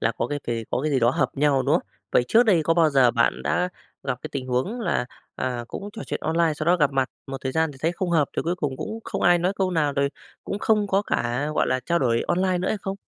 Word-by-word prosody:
là 115 - +1
có - - -2
cái 145 +1 -3
kì 115 -1 -2
có 125 - 0
cái 155 - 0
gì 135 - +2
đó 120 +1 +4
hợp 130 -1 +1
nhau, 140 -2 +3
đúng - - +2
không? - - 0 0.3
Vậy 120 - +4
trước 230 +2 +6
đây 185 -9 +3
có 165 +2 +2
bao 165 -3 +4
giờ 130 -3 +5
bạn 115 -1 +1
đã 180 0 +1 0.3
gặp 130 -3 -2
cái - - -5
tình 130 -2 -4
huống 130 - -1
là, 170 - 0 0.3
à, 125 -2 -3
cũng 200 - -6
trò 225 - -7
chuyện - - -3
online 165 -1 +1
sau 155 +1 -4
đó 180 +1 +5
gặp 150 -4 +2
mặt 135 -1 0 0.2
một 135 0 -5
thời 130 -1 -3
gian 160 -2 +1
thì 135 - -15
thấy 165 +2 +1
không 180 0 -3
hợp, 155 -4 +3
rồi - - -1
cuối 170 +2 0
cùng 140 -6 -2
cũng 220 +10 -5
không - - -4
ai 175 0 +5
nói 180 +3 +1
câu 190 -1 +1
nào, 150 -4 +1
rồi 140 0 +1 0.4
cũng 200 - -3
không 210 -2 +2
có 195 +1 +2
cả, 125 -2 -1
gọi - - +2
là, 130 0 0
trao 170 0 +2
đổi 115 -3 +1
online 185 0 +1
nữa 185 - -1
hay 215 - -1
không? 195 0 -4
150 Hz, 290 wpm, -24 LUFS, 130-180 Hz, 0.4 s, trước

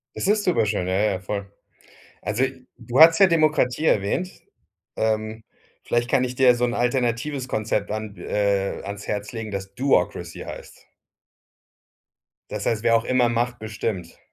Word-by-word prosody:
Das - - -2
ist 205 +1 +2
super 175 -11 +2
schön. 100 -4 -1
Ja, 95 - -1
ja, 100 +3 +2
ja, 95 - -3
voll. 100 +1 -5 0.7
Also, 110 +5 0 0.3
du 120 +3 -1
hattest 165 +1 +8
ja 195 - +9
Demokratie 155 -4 +2
erwähnt. 105 - +1 0.7
Ähm, 110 0 -1 0.4
vielleicht 120 +1 0
kann 130 - +3
ich 125 0 -4
dir 130 0 +4
ja 125 - +7
so 120 0 0
'n 120 -1 0
alternatives 125 +2 -1
Konzept 110 -3 -1
an 110 -1 -5
äh, 100 -1 -1
ans 100 0 -7
Herz 105 0 -3
legen, 115 -2 -5
das 100 0 -6
Do-ocracy 95 -9 0
heißt. - - -10 1.6
Das - - -4
heißt, 110 -2 0
wer 115 -1 +4
auch 115 - -1
immer 125 -2 +2
macht, 120 0 -1
bestimmt. 105 -5 -5
115 Hz, 165 wpm, -23 LUFS, 105-125 Hz, 1.6 s, ja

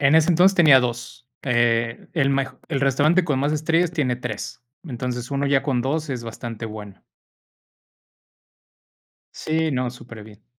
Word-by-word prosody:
En 145 +2 +4
ese 160 +1 +4
entonces 180 +3 +4
tenía 155 -7 +7
2, 120 0 -5 0.2
eh, 120 -2 0
el 145 -5 +2
mejo 135 -1 -2
el 140 -4 -2
restaurante 150 +7 +3
con 145 -5 -1
más 145 +2 0
estrellas 160 +3 +1
tiene 135 -8 0
3 120 -4 -6 0.2
Entonces, 125 -3 -5
1 140 0 -1
ya 140 -1 +2
con 130 -4 0
2 150 +3 -2
es 125 -3 -4
bastante 115 0 -7
bueno. 105 -3 -10 2.3
Sí, 160 0 -1
no, 125 -2 -1
súper 120 -3 -12
bien. 105 -1 -16
135 Hz, 155 wpm, -22 LUFS, 120-155 Hz, 2.3 s, tenía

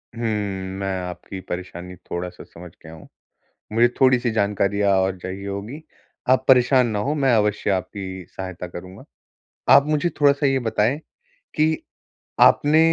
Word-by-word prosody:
हम्म, 105 -4 -2
मैं 95 -1 -2
आपकी 90 +1 -7
परेशानी 90 0 -6
थोड़ा-सा 90 0 -7
समझ 85 0 -13
गया 80 +1 -11
हूँ। 80 - -13 0.7
मुझे 115 +2 +4
थोड़ी-सी 125 -2 +4
जानकारियाँ 100 -1 +1
और 95 0 -1
चाहिए 95 +2 -7
होगी, 105 +10 -6 0.5
आप 130 0 +3
परेशान 130 0 +5
ना 110 -3 -2
हों 140 +8 -1
मैं 135 -4 +2
अवश्य 105 -1 +1
आपकी 95 -1 -4
सहायता 95 -2 -7
करूँगा। 90 +2 -10 0.7
आप 140 - +6
मुझे 155 +2 +1
थोड़ा-सा 140 0 +4
ये 135 -1 +2
बताएँ 110 +6 +1 0.6
कि, 155 +1 +2 0.6
आपने 150 +2 +5
105 Hz, 140 wpm, -22 LUFS, 95-130 Hz, 0.7 s, आप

